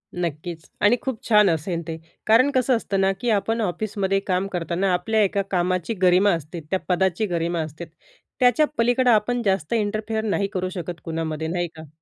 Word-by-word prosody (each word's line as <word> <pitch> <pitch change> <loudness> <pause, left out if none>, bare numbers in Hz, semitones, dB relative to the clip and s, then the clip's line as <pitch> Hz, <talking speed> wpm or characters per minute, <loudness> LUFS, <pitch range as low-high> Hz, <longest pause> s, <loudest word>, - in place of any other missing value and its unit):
नक्कीचं. 170 -1 -4 0.2
आणि 230 +4 +5
खूप 260 -5 -4
छान 210 -3 +6
असेल 165 +1 -1
ते. 160 - -4 0.3
कारण 240 +6 +5
कसं 255 0 +3
असतं 200 -4 -2
ना? 195 0 +3
की 245 - 0
आपण 225 +2 +1
ऑफिसमध्ये 195 0 -1
काम 185 0 0
करताना, 180 +2 0
आपल्या 220 +5 +1
एका 200 0 +1
कामाची 185 +3 0
गरिमा 185 +2 +5
असते, 165 +1 -5
त्या 190 - +1
पदाची 190 +2 +1
गरिमा 170 -2 -1
असते. 155 +2 -6 0.5
त्याच्या 250 +4 +4
पलीकडं 245 +2 +3
आपण 235 +3 +2
जास्त 190 -2 0
इंटरफेअर 220 0 -1
नाही 205 -2 0
करू 185 -1 -1
शकत 175 -3 -6
कुणामध्ये 160 -1 -3
नाही 175 +1 -1
का? 160 -1 -10
190 Hz, 175 wpm, -23 LUFS, 170-220 Hz, 0.5 s, छान